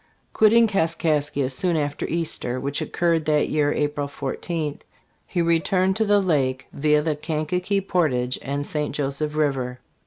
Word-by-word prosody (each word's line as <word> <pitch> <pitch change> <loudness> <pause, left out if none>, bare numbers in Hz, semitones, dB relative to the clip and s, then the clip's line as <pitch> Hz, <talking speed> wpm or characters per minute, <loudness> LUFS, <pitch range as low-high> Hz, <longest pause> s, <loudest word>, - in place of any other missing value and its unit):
* - - -42
Quitting 230 +2 +5
Kaskaskia 155 -7 0
soon 170 +5 0
after 145 -1 -2
Easter, 155 -6 -2
which 140 +1 -2
occurred 165 -2 0
that 150 -1 +2
year 150 -1 +2
April 145 -1 -1
14, 150 +2 -4 0.5
he 175 -3 0
returned 180 +3 +2
to 220 - +2
the 205 0 +4
Lake 135 -8 0
via 150 +1 +2
the 155 -1 0
Kankakee 165 +6 -1
portage 135 -10 0
and 140 +1 -3
St. 150 -2 -2
Joseph 150 +1 -2
river. 135 -5 -1
150 Hz, 150 wpm, -23 LUFS, 145-170 Hz, 0.5 s, Quitting